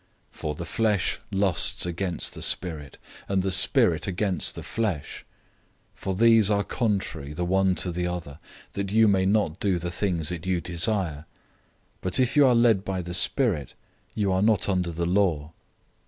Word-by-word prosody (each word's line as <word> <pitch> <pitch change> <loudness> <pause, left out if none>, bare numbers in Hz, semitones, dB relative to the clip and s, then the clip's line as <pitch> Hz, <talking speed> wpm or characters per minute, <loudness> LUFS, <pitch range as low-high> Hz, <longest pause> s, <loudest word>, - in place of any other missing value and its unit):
005:017 - - -21
For 75 -1 -3
the 85 - -6
flesh 105 0 0
lusts 95 -3 +2
against 90 0 -3
the - - -10
Spirit, 80 -6 -2 0.3
and 95 -1 +1
the 95 - -1
Spirit 80 -2 +3
against 95 -1 0
the - - -7
flesh; 105 -10 -4 0.8
and 95 -1 -2
these 115 -2 +5
are 100 -1 +1
contrary 95 - -3
to 90 +2 -2
one 95 0 +1
another, 90 -4 -4 0.3
that 100 -1 -4
you 110 +1 +4
may 95 -2 +2
not 100 -5 0
do 95 -3 +1
the 85 0 -4
things 85 -4 -1
that 85 -2 -5
you 90 -2 +1
desire. 85 -2 -1 0.7
005:018 - - -41
But 95 +4 0
if 125 -1 +1
you 145 -2 +6
are 125 - +4
led 115 -5 +3
by 95 -2 -3
the 90 +1 -7
Spirit, 90 - 0 0.4
you 100 -3 0
are 95 0 +1
not 105 -2 +2
under 90 -3 0
the 85 +1 -3
law. 85 -5 0
95 Hz, 170 wpm, -25 LUFS, 85-100 Hz, 0.8 s, you